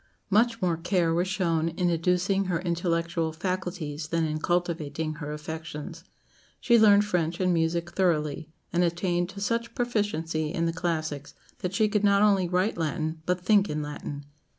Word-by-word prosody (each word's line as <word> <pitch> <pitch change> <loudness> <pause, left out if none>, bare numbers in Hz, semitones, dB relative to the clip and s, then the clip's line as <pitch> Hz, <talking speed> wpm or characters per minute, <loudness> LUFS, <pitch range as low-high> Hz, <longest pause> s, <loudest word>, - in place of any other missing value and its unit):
Much 225 +2 +3
more 170 -2 +1
care 170 -1 +1
was 175 +2 +1
shown 170 -4 0
in 175 +1 0
educing 180 +4 +1
her 175 -2 0
intellectual 170 -2 -1
faculties 170 -3 -4
than 165 0 0
in 155 0 -2
cultivating 160 -3 -1
her 150 -1 -6
affections. 160 +2 -7 0.6
She 235 -2 +4
learned 205 -1 +6
French 170 -4 -1
and 185 -1 +2
music 170 +1 0
thoroughly, 160 -4 0 0.2
and 175 +1 +3
attained 175 0 0
to 200 +1 -9
such 230 +3 -1
proficiency 165 -10 -1
in 170 -2 -1
the 165 - 0
classics 155 -4 -3 0.2
that 180 +1 -3
she 215 +1 +3
could 210 0 0
not 200 0 +4
only 195 -4 +3
write 185 +2 0
Latin 160 0 -2
but 180 0 0
think 205 -1 +4
in 150 0 -2
Latin. 145 -1 -6
170 Hz, 165 wpm, -27 LUFS, 160-190 Hz, 0.6 s, learned